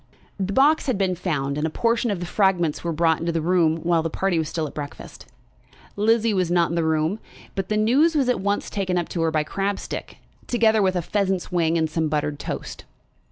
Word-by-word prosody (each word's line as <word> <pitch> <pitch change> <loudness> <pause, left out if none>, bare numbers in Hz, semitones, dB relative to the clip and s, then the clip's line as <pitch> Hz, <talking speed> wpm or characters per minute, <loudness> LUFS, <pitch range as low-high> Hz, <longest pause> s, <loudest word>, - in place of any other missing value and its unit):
The 195 0 -1
box 285 +7 +3
had 255 -6 +1
been 190 -2 +1
found, 150 -6 -2
and 155 - 0
a - - -3
portion 230 +7 0
of 200 -4 -1
the 175 - -4
fragments 175 -5 +1
were 170 - -1
brought 165 0 +2
into 170 +1 -1
the 165 - -1
room 165 -1 +2
while 170 -1 +2
the 165 - -2
party 185 0 0
were - - +1
still 160 0 -3
at 145 - -7
breakfast. 145 -1 -8 0.7
Lizzie 225 +1 +2
was 185 -3 +1
not 170 -1 +2
in 170 - -2
the 170 - +1
room, 160 +5 0 0.3
but 195 -2 -4
the 215 - +1
news 270 +10 +3
was 275 -4 +2
at 250 -6 +1
once 200 +1 -1
taken 185 -3 -1
up 175 - -2
to 170 - -3
her 165 - +2
by 155 -1 +1
Crabstick, 195 +5 -4 0.3
together 220 -3 +3
with 190 -1 +2
a 175 - -1
pheasant's 195 -1 -1
wing 170 -2 +1
and 160 -1 +1
some 160 0 -1
buttered 150 -1 -1
toast. - - -6
180 Hz, 225 wpm, -23 LUFS, 160-205 Hz, 0.7 s, box